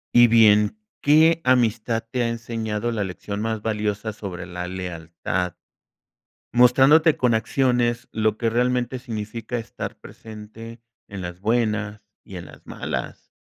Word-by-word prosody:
Y 120 Hz, 0 st, +8 dB
bien, 110 Hz, -, +5 dB, 0.2 s
¿qué 160 Hz, +3 st, +5 dB
amistad 115 Hz, -2 st, +1 dB
te 125 Hz, -, -1 dB
ha 115 Hz, -, 0 dB
enseñado 115 Hz, -1 st, -3 dB
la 110 Hz, -3 st, -1 dB
lección 100 Hz, +2 st, -5 dB
más 110 Hz, -1 st, -2 dB
valiosa 105 Hz, 0 st, -2 dB
sobre 95 Hz, -4 st, -7 dB
la 90 Hz, 0 st, -6 dB
lealtad? 90 Hz, 0 st, -4 dB, 1.0 s
Mostrándote 135 Hz, +6 st, +6 dB
con 125 Hz, -2 st, +2 dB
acciones 120 Hz, +1 st, +1 dB
lo 110 Hz, -1 st, 0 dB
que 115 Hz, -1 st, 0 dB
realmente 125 Hz, +1 st, 0 dB
significa 115 Hz, +1 st, -5 dB
estar 115 Hz, -, -6 dB
presente 115 Hz, +1 st, -11 dB, 0.3 s
en 100 Hz, -2 st, -7 dB
las 90 Hz, 0 st, -7 dB
buenas 110 Hz, -2 st, 0 dB, 0.2 s
y 95 Hz, -, -11 dB
en 85 Hz, -, -7 dB
las -, -, -15 dB
malas. -, -, -5 dB
110 Hz, 135 wpm, -23 LUFS, 105-120 Hz, 1.0 s, Y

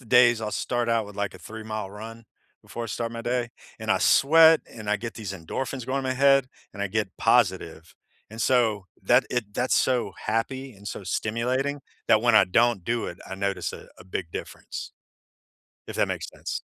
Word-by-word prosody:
the -, -, -17 dB
days 120 Hz, -2 st, +6 dB
I'll 110 Hz, -1 st, -3 dB
start 120 Hz, -1 st, -1 dB
out 115 Hz, -2 st, +1 dB
with, 105 Hz, -, -12 dB
like, 100 Hz, -1 st, -2 dB
a -, -, -10 dB
three-mile 110 Hz, -2 st, -6 dB
run, 115 Hz, +2 st, -9 dB, 0.4 s
before 120 Hz, -, -6 dB
I -, -, -4 dB
start 115 Hz, +1 st, -3 dB
my 115 Hz, -, -5 dB
day. 120 Hz, 0 st, -1 dB, 0.3 s
And, -, -, -3 dB
I -, -, +4 dB
sweat, 160 Hz, +3 st, +6 dB
and 110 Hz, -3 st, -9 dB
I 105 Hz, -, +3 dB
get 115 Hz, +2 st, -6 dB
these 105 Hz, -4 st, -5 dB
endorphins 120 Hz, +9 st, -4 dB
going 130 Hz, +3 st, -1 dB
in 135 Hz, -, -3 dB
my 130 Hz, -, 0 dB
head, 135 Hz, 0 st, +5 dB, 0.3 s
and 100 Hz, -, -9 dB
I -, -, +1 dB
get 105 Hz, +1 st, -1 dB
positive, 95 Hz, -8 st, +1 dB, 0.4 s
and 110 Hz, +1 st, -8 dB
so, 115 Hz, -5 st, +2 dB, 0.2 s
that 120 Hz, +6 st, +4 dB
it 110 Hz, -5 st, -2 dB
that's 125 Hz, +4 st, +1 dB
so 125 Hz, -6 st, +1 dB
happy, 130 Hz, +5 st, -2 dB
and 100 Hz, -1 st, -9 dB
so 100 Hz, -, -6 dB
stimulating, 125 Hz, +9 st, -1 dB, 0.3 s
that 110 Hz, -, +5 dB
when 120 Hz, -1 st, +4 dB
I 110 Hz, -, +8 dB
don't 115 Hz, +2 st, +2 dB
do 115 Hz, +5 st, -1 dB
it, 85 Hz, -, -7 dB
I -, -, -5 dB
notice 100 Hz, 0 st, -2 dB
a -, -, -11 dB
a -, -, -13 dB
big 90 Hz, -2 st, -5 dB
difference, -, -, -7 dB, 1.0 s
if -, -, -6 dB
that -, -, +3 dB
makes -, -, -4 dB
sense. -, -, -5 dB
115 Hz, 205 wpm, -26 LUFS, 105-125 Hz, 1.0 s, I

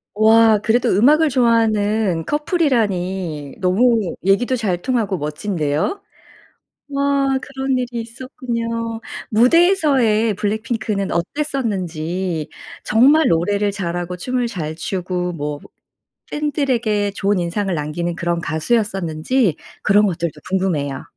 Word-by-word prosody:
와. 220 Hz, +1 st, +5 dB
그래도 230 Hz, +3 st, +2 dB
음악을 295 Hz, -, +4 dB
좋아하는 220 Hz, -, +2 dB
커플이라니 190 Hz, -, -1 dB
너무 205 Hz, +1 st, +2 dB
얘기도 240 Hz, +7 st, +2 dB
잘 185 Hz, -7 st, -1 dB
통하고 225 Hz, -7 st, 0 dB
멋진데요. 155 Hz, -, -2 dB, 0.9 s
와 275 Hz, -1 st, +1 dB
그런 265 Hz, -1 st, -2 dB
일이 245 Hz, -1 st, -3 dB
있었군요. 230 Hz, -1 st, -4 dB, 0.3 s
무대에서의 250 Hz, -, +3 dB
블랙핑크는 215 Hz, 0 st, -2 dB
어땠었는지 180 Hz, -, -2 dB, 0.3 s
정말 280 Hz, +8 st, +4 dB
노래를 200 Hz, +5 st, +1 dB
잘하고 175 Hz, -2 st, -3 dB
춤을 250 Hz, +6 st, -1 dB
잘 160 Hz, -6 st, -4 dB
추고 180 Hz, +1 st, -3 dB
뭐 150 Hz, -2 st, -4 dB, 0.7 s
팬 295 Hz, 0 st, -1 dB
들에게 230 Hz, -8 st, 0 dB
좋은 200 Hz, 0 st, 0 dB
인상을 180 Hz, +2 st, -1 dB
남기는 165 Hz, +3 st, -3 dB
그런 170 Hz, 0 st, -1 dB
가수였었는지 190 Hz, -, 0 dB, 0.3 s
그런 210 Hz, +1 st, +4 dB
것들도 170 Hz, -3 st, -2 dB, 0.2 s
궁금해요. 165 Hz, -8 st, -1 dB
210 Hz, 270 characters per minute, -19 LUFS, 175-245 Hz, 0.9 s, 와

